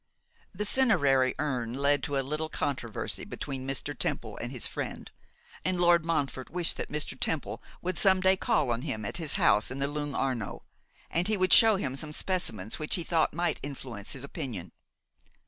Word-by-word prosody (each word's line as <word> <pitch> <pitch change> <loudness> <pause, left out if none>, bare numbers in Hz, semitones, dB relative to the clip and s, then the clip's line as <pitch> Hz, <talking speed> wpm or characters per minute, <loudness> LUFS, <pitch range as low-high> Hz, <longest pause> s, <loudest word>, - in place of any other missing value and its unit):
The 205 +3 -3
cinerary 145 - +3
urn 125 -5 -2
led 140 +1 +2
to 145 0 -2
a 135 - 0
little 155 +3 -2
controversy 130 -8 -2
between 135 -2 -5
Mr. 135 -2 -1
Temple - - -2
and - - -4
his - - -2
friend; - - -4 0.5
and 185 -1 0
Lord 170 -2 +5
Montfort 140 -5 -1
wished 175 +1 +1
that - - -5
Mr. 150 0 -2
Temple - - -2 0.2
would 185 0 -1
some 190 -2 +5
day 190 +1 +4
call 185 - +1
on 120 0 -1
him 110 -8 -3
at 170 - -3
his 160 -4 0
house 105 +1 +4
in 130 - -5
the 140 0 0
Lung' 145 -1 -3
Arno, 125 -6 -2 0.5
and 175 +2 +1
he 215 -1 +1
would 185 -1 +3
show 225 -2 +9
him 135 -9 -2
some 150 +2 -4
specimens 115 - -2
which 155 - +2
he 175 - -1
thought 165 -2 +2
might 175 +1 0
influence 130 -7 -5
his 130 - -7
opinion. 115 -10 -5
145 Hz, 185 wpm, -29 LUFS, 130-175 Hz, 0.5 s, show